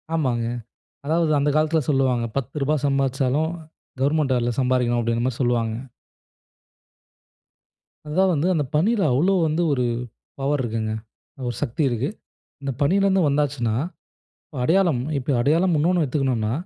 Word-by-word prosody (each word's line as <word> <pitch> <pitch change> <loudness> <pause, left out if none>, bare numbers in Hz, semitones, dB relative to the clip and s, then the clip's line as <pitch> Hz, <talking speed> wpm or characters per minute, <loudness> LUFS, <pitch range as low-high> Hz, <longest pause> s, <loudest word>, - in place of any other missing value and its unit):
ஆமாங்க. 125 -7 0 0.6
அதாவது 160 +1 +1
அந்த 145 +1 +2
காலத்தில 155 +1 +2
சொல்லுவாங்க, 130 -4 +2
"ரூ.10 140 +2 -1
சம்பாதிச்சாலும் 135 +2 +1 0.5
கவர்ன்மெண்ட் 145 0 +2
வேலையில 120 0 0
சம்பாதிக்கணும்." 125 -2 +1
அப்படிங்கிற 115 +1 0
மாரி 130 -2 -3
சொல்லுவாங்க. 120 -3 +1 2.3
அது 150 - -6
தான் 190 -1 +4
வந்து, 155 +2 +1
அந்த 150 - +1
பணியில 205 +8 +2
அவ்வளவு 180 +9 +3
வந்து 155 +3 0
ஒரு 125 -2 0 0.5
பவர் 140 0 0
இருக்குங்க 110 -2 -2 0.6
ஒரு 120 - -3
சக்தி 145 +3 -2
இருக்கு. 120 +2 -1 0.5
இந்த 140 - -2
பணியில 195 +7 +3
இருந்து 190 -1 +3
வந்தாச்சுன்னா, 140 -6 0 0.9
அடையாளம் 165 -4 +2 0.2
இப்போ 135 +2 -3
அடையாளம் 165 +7 +3
இன்னொன்னு 170 +1 +2
வச்சுக்கணும்ன்னா. 125 -6 0
140 Hz, 125 wpm, -23 LUFS, 125-155 Hz, 2.3 s, தான்